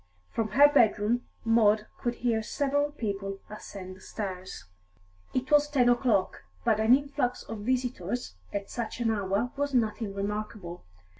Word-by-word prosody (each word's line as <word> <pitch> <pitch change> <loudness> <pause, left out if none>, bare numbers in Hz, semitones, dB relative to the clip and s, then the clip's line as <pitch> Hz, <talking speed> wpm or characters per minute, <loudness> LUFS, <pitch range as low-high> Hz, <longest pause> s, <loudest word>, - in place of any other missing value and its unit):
From 225 -2 0
her 285 +3 +8
bedroom 235 -2 +3 0.2
Maud 220 -2 +4
could 240 0 -1
hear 230 -2 0
several 285 +5 0
people 200 -7 -4
ascend 190 -3 -8
the 190 - -17
stairs. 190 - -6 0.7
It 255 +1 -2
was 295 0 +5
ten 255 -4 +4
o'clock, 240 -6 +2 0.2
but 220 -2 +3
an 220 +3 +6
influx 280 -3 -2
of 225 - -7
visitors 245 - -2 0.2
at 200 -1 -3
such 235 -1 -4
an 230 -2 +2
hour 205 +3 0
was 285 -1 -1
nothing 220 -3 0
remarkable. 200 - -4
225 Hz, 145 wpm, -29 LUFS, 205-250 Hz, 0.7 s, her